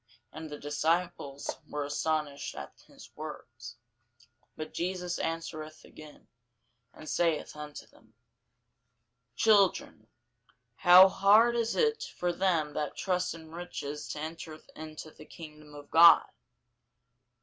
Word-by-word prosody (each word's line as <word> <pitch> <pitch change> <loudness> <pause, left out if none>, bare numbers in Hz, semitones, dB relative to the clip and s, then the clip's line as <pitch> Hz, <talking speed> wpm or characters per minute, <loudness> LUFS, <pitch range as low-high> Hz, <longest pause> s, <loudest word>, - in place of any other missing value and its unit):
And 160 0 -8
the 150 - -7
disciples 150 -1 -2
were 145 -1 -3
astonished 145 -1 -2
at 70 0 -8
his - - -16
words. 120 -6 -9 0.8
But 155 - -7
Jesus 180 0 -3
answereth 155 -1 -5
again, 155 -1 -15 0.6
and 155 - -13
saith 165 -3 0
unto 150 -1 -9
them, - - -25 1.2
Children, 205 - +2 0.7
how 180 +1 +9
hard 215 +5 +4
is 230 -1 -1
it 455 -1 +1 0.2
for 175 0 -1
them 170 -5 0
that 150 0 -4
trust 180 -3 -1
in 160 -1 -13
riches 155 -4 -6
to - - -6
enter 160 0 -7 0.2
into 155 0 -9
the 155 - -15
kingdom 150 -2 -12
of 145 0 -12
God! 170 +1 +8
155 Hz, 115 wpm, -30 LUFS, 150-175 Hz, 1.2 s, how